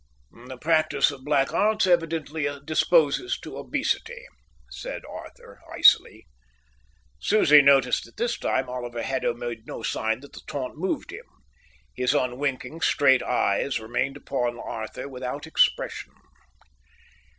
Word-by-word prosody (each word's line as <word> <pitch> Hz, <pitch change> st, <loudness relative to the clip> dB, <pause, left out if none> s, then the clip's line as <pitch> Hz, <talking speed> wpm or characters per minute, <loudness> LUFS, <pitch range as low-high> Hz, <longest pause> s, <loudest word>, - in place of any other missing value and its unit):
"The 130 Hz, -, -8 dB
practice 155 Hz, +1 st, +2 dB
of 135 Hz, -2 st, -11 dB
black 140 Hz, -1 st, +1 dB
arts 215 Hz, 0 st, +2 dB
evidently 165 Hz, -4 st, 0 dB, 0.2 s
disposes 160 Hz, -, +2 dB
to -, -, -9 dB
obesity," 485 Hz, +2 st, -2 dB, 0.5 s
said -, -, -7 dB
Arthur, 480 Hz, -1 st, -12 dB
icily. 110 Hz, -, +4 dB, 0.9 s
Susie 150 Hz, -9 st, +6 dB
noticed 135 Hz, -3 st, +4 dB
that 115 Hz, -, -19 dB
this 240 Hz, 0 st, 0 dB
time 130 Hz, 0 st, 0 dB
Oliver 120 Hz, -2 st, -5 dB
Haddo 130 Hz, -3 st, -1 dB
made 120 Hz, -1 st, -6 dB
no -, -, -7 dB
sign 110 Hz, +2 st, -1 dB
that 140 Hz, -, -14 dB
the -, -, -10 dB
taunt 130 Hz, -3 st, -5 dB
moved 185 Hz, +5 st, -3 dB
him. -, -, -9 dB, 0.7 s
His 125 Hz, 0 st, +1 dB
unwinking, 130 Hz, +3 st, -2 dB
straight 135 Hz, -4 st, +4 dB
eyes 125 Hz, +2 st, 0 dB
remained 120 Hz, +5 st, -2 dB
upon 120 Hz, -4 st, -2 dB
Arthur 110 Hz, +4 st, -6 dB
without 130 Hz, +2 st, -6 dB
expression. 160 Hz, -, 0 dB
140 Hz, 125 wpm, -25 LUFS, 125-160 Hz, 0.9 s, Susie